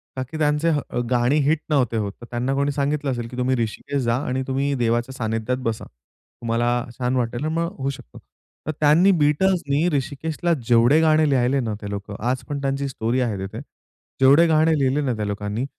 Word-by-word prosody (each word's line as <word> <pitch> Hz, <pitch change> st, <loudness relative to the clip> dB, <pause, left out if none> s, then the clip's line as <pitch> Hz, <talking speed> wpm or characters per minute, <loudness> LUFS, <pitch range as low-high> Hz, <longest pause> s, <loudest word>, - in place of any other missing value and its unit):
का 130 Hz, -, -2 dB
की 155 Hz, +5 st, -8 dB
त्यांची 150 Hz, +2 st, +1 dB
ह 120 Hz, -, -3 dB
गाणी 125 Hz, +2 st, +2 dB
हिट 155 Hz, +1 st, +2 dB
नव्हते 125 Hz, -6 st, +1 dB
होत. 100 Hz, -2 st, -2 dB
तर -, -, -8 dB
त्यांना 125 Hz, +3 st, -1 dB
कोणी 140 Hz, +1 st, +1 dB
सांगितलं 145 Hz, 0 st, -1 dB
असेल 120 Hz, -2 st, -4 dB
की 125 Hz, -, -9 dB
तुम्ही 130 Hz, +1 st, +1 dB
ऋषिकेश 120 Hz, +4 st, -2 dB
जा 115 Hz, 0 st, +1 dB
आणि 130 Hz, +1 st, -1 dB
तुम्ही 140 Hz, +2 st, 0 dB
देवाच्या 120 Hz, +1 st, 0 dB
सानिध्यात 115 Hz, +1 st, -2 dB
बसा. 115 Hz, -1 st, -3 dB
तुम्हाला 115 Hz, -, -5 dB, 0.3 s
छान 125 Hz, 0 st, -1 dB
वाटेल 120 Hz, +1 st, -1 dB
आणि 155 Hz, -, -1 dB
मग 170 Hz, +4 st, -2 dB
होऊ 135 Hz, 0 st, -2 dB
शकतो. 100 Hz, -, -9 dB, 0.5 s
तर -, -, +1 dB
त्यांनी 155 Hz, +6 st, +5 dB
Beatlesनी 150 Hz, 0 st, +2 dB
ऋषिकेशला 155 Hz, +5 st, -2 dB
जेवढे 120 Hz, +5 st, +5 dB
गाणे 155 Hz, -1 st, +4 dB
लिहिले 135 Hz, 0 st, +2 dB
ना, 110 Hz, -4 st, -2 dB
ते 100 Hz, -, -6 dB
लोकं 100 Hz, 0 st, -6 dB
आज 130 Hz, +1 st, -1 dB
पण 145 Hz, -1 st, -3 dB
त्यांची 135 Hz, 0 st, -1 dB
स्टोरी 120 Hz, -1 st, -1 dB
आहे 115 Hz, -5 st, -1 dB
तिथे. 95 Hz, 0 st, -6 dB, 0.6 s
जेवढे 140 Hz, +6 st, +6 dB
गाणे 160 Hz, 0 st, +3 dB
लिहिले 135 Hz, +2 st, +1 dB
ना 135 Hz, -4 st, 0 dB
त्या 105 Hz, -1 st, -3 dB
लोकांनी, 105 Hz, +4 st, -3 dB
130 Hz, 195 wpm, -22 LUFS, 120-145 Hz, 0.6 s, जेवढे